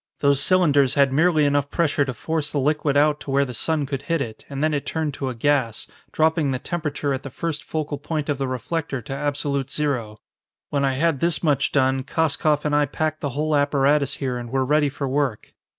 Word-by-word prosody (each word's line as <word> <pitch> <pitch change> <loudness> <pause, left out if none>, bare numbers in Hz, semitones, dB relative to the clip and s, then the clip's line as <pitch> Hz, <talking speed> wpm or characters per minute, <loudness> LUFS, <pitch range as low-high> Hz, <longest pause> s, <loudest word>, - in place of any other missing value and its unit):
Those 140 -1 +4
cylinders 145 -8 +3
had 140 -2 +3
merely 155 0 +3
enough 145 -1 +1
pressure 155 -3 +1
to 130 - -4
force 160 0 -2
the - - -2
liquid 145 0 +1
out 150 0 +3
to - - -9
where 140 +1 +2
the 125 - -7
sun 155 +3 0
could 135 -1 -4
hit 165 +3 -1
it, 115 -6 -6
and 140 +1 -3
then 155 0 +2
it 145 - -1
turned 160 -3 -2
to 135 -1 -3
a 125 - -5
gas, 120 -3 0 0.3
dropping 160 -2 +2
the 130 - 0
temperature 150 -1 -2
at 130 - -3
the 135 - -7
first 160 +3 -4
focal 150 -2 -3
point 150 0 -3
of 145 -3 -1
the 135 - -1
reflector 140 +3 -3
to 135 - -6
absolute 140 -1 -2
zero. 125 -9 -2 0.5
When 140 -1 0
I 135 -1 +2
had 160 0 +1
this 170 +1 +1
much 145 -3 +2
done, 130 -1 +2
Koskoff 150 +1 0
and 150 -1 +1
I 145 0 +3
packed 155 +2 -2
the 145 - -1
whole 155 0 +1
apparatus 145 0 +2
here 125 -3 -3
and 120 -1 -7
were 130 +1 0
ready 150 +1 +2
for 140 0 -4
work. 135 -5 -2
145 Hz, 220 wpm, -23 LUFS, 135-155 Hz, 0.5 s, Those